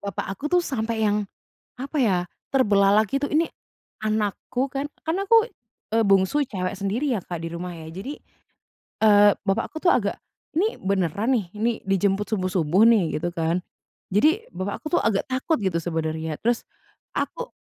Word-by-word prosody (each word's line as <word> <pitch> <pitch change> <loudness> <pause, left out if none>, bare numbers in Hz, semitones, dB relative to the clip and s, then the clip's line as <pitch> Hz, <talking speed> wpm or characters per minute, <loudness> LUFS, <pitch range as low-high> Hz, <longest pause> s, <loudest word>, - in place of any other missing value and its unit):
Bapak 200 -3 -4
aku 280 +10 -5
tuh 355 +1 +3
sampai 225 -4 -1
yang, 205 -1 +1 0.5
apa 280 +3 -4
ya, 190 -5 +3 0.4
terbelalak 205 -4 +4
gitu, 275 +1 0
"Ini 320 +2 +3 0.6
anakku 215 +5 -1
kan" 275 +1 -1 0.2
kan 325 - +1
aku, 455 +3 +5 0.5
eee, 225 - +4
bungsu, 195 +9 +3
cewek 185 -4 -3
sendiri 235 +7 0
ya 195 - -2
Kak, 175 -2 -5
di 165 - -4
rumah 175 +1 -5
ya. 160 -1 -9
Jadi, 200 - -7 0.8
eee, 205 -1 +7 0.2
bapak 195 +4 0
aku 315 - -5
tuh 355 - +6
agak - - 0 0.4
"Ini 420 +6 +1
beneran 200 - +1
nih, 200 - -4
ini 230 +3 +1
dijemput 195 +1 +1
subuh-subuh 185 -1 +1
nih?" 185 -10 +3
Gitu 175 - -1
kan. 165 +2 +1 0.5
Jadi 320 - +2
bapak 195 +2 -4
aku - - -18
tuh - - 0
agak 210 -3 +2
takut 260 +5 0
gitu 180 -3 +1
sebenernya 160 -1 -2
terus 235 +1 +1 0.5
aku - - -3
205 Hz, 165 wpm, -24 LUFS, 185-260 Hz, 0.8 s, eee